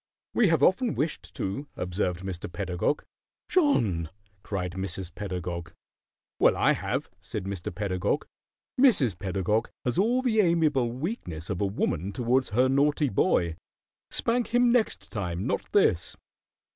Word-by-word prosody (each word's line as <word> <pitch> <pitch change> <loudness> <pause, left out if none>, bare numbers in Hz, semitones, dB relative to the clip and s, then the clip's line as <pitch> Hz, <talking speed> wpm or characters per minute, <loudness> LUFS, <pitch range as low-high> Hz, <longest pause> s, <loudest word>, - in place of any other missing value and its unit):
"We 235 - +4
have 165 -5 +3
often 225 - +3
wished 150 +1 -2
to," 120 +10 -3
observed 90 -1 -1
Mr. 95 -2 -5
Pedagog. 95 +8 -1 0.4
"John!" 110 - +2 0.3
cried 90 -4 -3
Mrs. 95 0 -4
Pedagog. 90 -4 -5 0.7
"Well, - - +5
I - - +4
have," - - -3
said 105 - -5
Mr. 95 -2 -4
Pedagog. 100 - -1 0.5
"Mrs. 145 - +4
Pedagog 95 +4 0 0.2
has 125 +6 0
all 245 +6 +2
the 225 -4 +2
amiable 155 - +3
weakness 120 - -4
of 90 - -2
a 100 - +2
woman 95 -2 -1
towards 125 +4 +1
her 125 +5 +3
naughty 145 +2 +2
boy. 85 -5 +1 0.5
Spank 240 +1 +1
him 245 0 +3
next 235 -3 0
time, 90 -3 -3
not - - -2
this." 85 - +3
105 Hz, 135 wpm, -27 LUFS, -, 0.7 s, Well